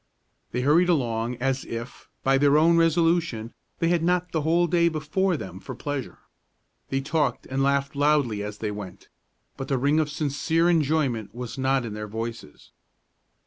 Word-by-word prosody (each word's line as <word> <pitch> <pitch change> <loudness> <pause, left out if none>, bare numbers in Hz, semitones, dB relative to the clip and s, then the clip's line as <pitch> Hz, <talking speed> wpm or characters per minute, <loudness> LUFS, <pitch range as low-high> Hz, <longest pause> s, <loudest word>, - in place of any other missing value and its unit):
They 125 - -1
hurried 160 +7 +4
along, 120 -6 0
as 135 +2 -1
if, 115 +1 -8
by 135 0 +3
their 145 +1 +4
own 165 +2 +5
resolution, 165 -8 +2 0.2
they 165 - +1
had 175 -1 +2
not 180 +1 +1
the 160 - 0
whole 165 +3 +3
day 170 -1 +3
before 160 +4 0
them 95 -6 -8
for - - -8
pleasure. 145 -3 -5 0.7
They 135 0 0
talked 140 -3 -1
and 135 +1 -2
laughed 140 0 +1
loudly 140 -7 +2
as 105 0 -5
they 105 -1 -3
went, 100 -3 -9 0.5
but 135 -1 -5
the 135 - 0
ring 145 +4 +2
of 155 -1 0
sincere 160 +3 +1
enjoyment 140 - 0
was 125 -1 -6
not 135 -1 +1
in 110 - -5
their 105 0 -5
voices. 115 -7 -7
140 Hz, 170 wpm, -25 LUFS, 120-160 Hz, 0.7 s, own